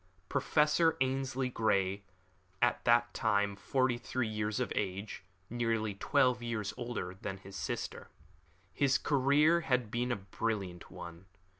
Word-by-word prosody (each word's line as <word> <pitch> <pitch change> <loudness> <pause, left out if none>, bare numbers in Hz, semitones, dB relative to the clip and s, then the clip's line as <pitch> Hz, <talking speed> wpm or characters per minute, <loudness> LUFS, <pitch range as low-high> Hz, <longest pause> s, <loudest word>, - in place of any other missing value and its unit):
Professor 150 +4 +3
Ainslie 130 0 0
Grey 100 -4 +1
was - - -23 0.6
at 120 0 +2
that 120 0 +4
time 100 -2 +1
forty 130 +3 0
three 125 0 -2
years 105 -1 -2
of - - -1
age 100 0 -3 0.2
nearly 115 -2 -1
twelve 125 +4 +2
years 115 -4 -3
older 120 -7 -4
than 95 -1 -4
his 95 0 -12
sister. - - -4 0.6
His 135 +6 +3
career 150 +4 +3
had 125 -7 0
been 120 +1 0
a - - +2
brilliant 95 -2 -4
one. 90 0 -10
115 Hz, 135 wpm, -33 LUFS, 100-130 Hz, 0.6 s, that